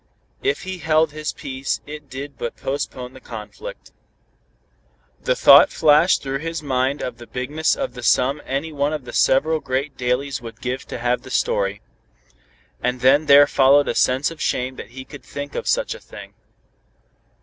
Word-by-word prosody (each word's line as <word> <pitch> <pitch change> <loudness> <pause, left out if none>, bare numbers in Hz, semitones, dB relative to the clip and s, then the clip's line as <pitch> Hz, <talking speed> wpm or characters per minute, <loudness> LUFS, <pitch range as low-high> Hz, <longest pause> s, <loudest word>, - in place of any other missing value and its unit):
If 405 0 -1
he 185 -1 -5
held 160 -1 +2
his 155 0 -4
peace 135 -4 -4
it 150 -1 -9
did 140 +2 -7
but 120 - -5
postpone 130 -2 -4
the 130 - -12
conflict. 380 - -9 1.3
The - - +1
thought - - +8
flashed 155 +3 +4
through 135 0 -3
his 165 +1 -4
mind 130 0 0
of 120 -2 -5
the 120 - -11
bigness 145 +5 -1
of 270 -2 -4
the 125 - -8
sum 130 +4 +2
any 140 +4 -3
one 145 +1 0
of 150 -4 -5
the - - -9
several 155 +4 +3
great 135 +1 -3
dailies 125 +2 -1
would 115 -2 -10
give 125 +1 -4
to - - -5
have 120 +1 0
the - - -12
story. 100 -4 0 1.0
And 125 0 -1
then 140 +4 +4
there 140 +1 +8
followed 140 +1 +4
a - - 0
sense 130 +5 +2
of 165 - -10
shame 130 +1 -1
that - - -9
he 130 +2 -9
could 145 - -11
think 145 0 -7
of - - -4
such - - +1
a - - -10
thing. - - -12
140 Hz, 180 wpm, -21 LUFS, 125-150 Hz, 1.3 s, thought